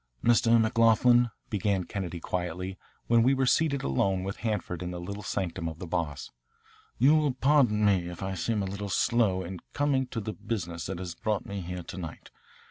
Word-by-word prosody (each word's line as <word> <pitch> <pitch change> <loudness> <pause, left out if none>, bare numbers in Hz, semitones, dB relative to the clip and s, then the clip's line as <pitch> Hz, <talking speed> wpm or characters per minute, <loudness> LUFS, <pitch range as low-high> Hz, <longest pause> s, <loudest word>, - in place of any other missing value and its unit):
"Mr. 115 0 +5
McLoughlin," 115 +2 +4 0.2
began 100 -2 0
Kennedy 90 -3 -5
quietly, 90 +2 -4 0.3
when 115 0 +4
we 130 +4 +4
were 135 0 +1
seated 140 0 +2
alone 95 +8 +1
with 95 +1 -4
Hanford 105 -6 -3
in 90 - -3
the 90 -1 -5
little 100 +4 -6
sanctum 85 -4 -3
of 80 - -9
the 90 - -7
Boss, 80 -4 -3 0.7
"you 135 +6 +5
will 150 -4 +2
pardon 130 -7 +3
me 95 -4 +2
if 90 +2 -7
I 95 0 -2
seem 105 +4 -1
a - - -2
little 100 +1 -5
slow 100 -2 +2
in 90 +1 -6
coming 140 -3 +1
to 120 - -4
the 110 0 -4
business 90 -9 -4
that 95 -1 -4
has 90 -1 -5
brought 105 +4 -2
me 100 -1 -5
here 90 0 -5
to - - -9
night. 80 -4 -8
100 Hz, 195 wpm, -28 LUFS, 90-115 Hz, 0.7 s, Mr